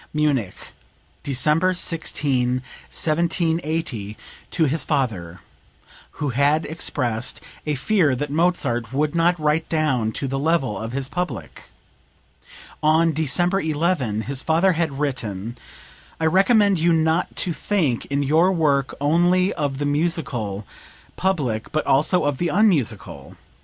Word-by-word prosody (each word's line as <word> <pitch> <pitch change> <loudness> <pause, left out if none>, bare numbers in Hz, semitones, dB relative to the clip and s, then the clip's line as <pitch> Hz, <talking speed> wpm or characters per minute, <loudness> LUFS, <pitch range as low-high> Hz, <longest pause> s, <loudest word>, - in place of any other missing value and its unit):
(Munich, 140 -10 0 0.7
December 150 +7 +2
16, 130 -7 -1 0.3
1780, 160 - -1 0.3
to 165 - +1
his 150 0 0
father, 105 - -2 0.7
who 145 - -3
had 140 +5 +2
expressed 125 -7 -1 0.3
a 150 - 0
fear 155 -1 +2
that 145 +3 -4
Mozart 140 -9 0
would 150 +2 0
not 170 +1 +2
write 155 +1 0
down 135 -9 +1
to 135 - -2
the 135 +1 -2
level 145 -7 +1
of 110 +4 -5
his 135 +1 -3
public. 180 +5 -5 1.1
[On 160 +2 +3
December 175 +6 +1
11, 150 - 0
his 135 +3 -3
father 165 +6 +3
had 160 -5 -1
written: 115 -6 -3 0.6
"I 160 - 0
recommend 195 +2 +4
you 170 +1 +3
not 160 +2 +1
to 175 - 0
think 160 - -1
in 140 0 0
your 160 +6 +3
work 145 -6 +1
only 175 +6 +2
of 145 -4 -2
the 145 - -2
musical 145 - -1 0.5
public, 140 -13 -1
but 155 - -1
also 155 +7 +3
of 145 -2 -1
the 175 - +1
unmusical. 115 - 0
150 Hz, 125 wpm, -22 LUFS, 130-165 Hz, 1.1 s, recommend